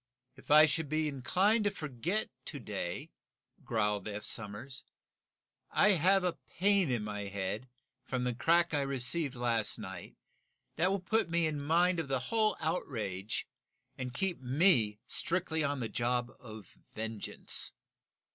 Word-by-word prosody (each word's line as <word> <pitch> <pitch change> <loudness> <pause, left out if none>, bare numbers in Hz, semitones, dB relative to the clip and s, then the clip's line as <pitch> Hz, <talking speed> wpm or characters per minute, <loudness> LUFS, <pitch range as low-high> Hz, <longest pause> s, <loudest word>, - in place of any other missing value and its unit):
"If 130 - -17
I 155 +1 +9
should 150 0 -1
be 155 +1 +1
inclined 185 - +2
to - - +4
forget 165 - -3
to 150 - -5
day," 100 -6 -5 0.5
growled 105 -3 0
Eph 105 0 -5
Somers, 115 +5 -2 0.9
"I 210 - +4
have 190 +1 +4
a 180 -2 -1 0.2
pain 200 -3 +4
in 120 -4 0
my 105 -1 -4
head, 100 +5 -4 0.3
from 130 -1 -2
a 125 - 0
crack 170 +7 +3
I 145 - +2
received 140 +2 +1
last 120 -3 +1
night, 95 -2 -8 0.6
that 175 +4 +2
will 195 +1 0
put 220 +1 +1
me 170 0 +2
in 150 -2 -2
mind 170 +4 +3
of 160 - -3
the 135 -1 +1 0.2
whole 215 -2 +3
outrage, 110 - -3 0.5
and 125 -1 -5
keep 175 +5 -2
me 125 - +3
strictly 165 +2 0
on 140 -2 -1
the 115 - -1
job 120 +1 -1
of 110 -3 -12 0.2
vengeance!" 110 -1 -1
135 Hz, 145 wpm, -32 LUFS, 110-170 Hz, 0.9 s, I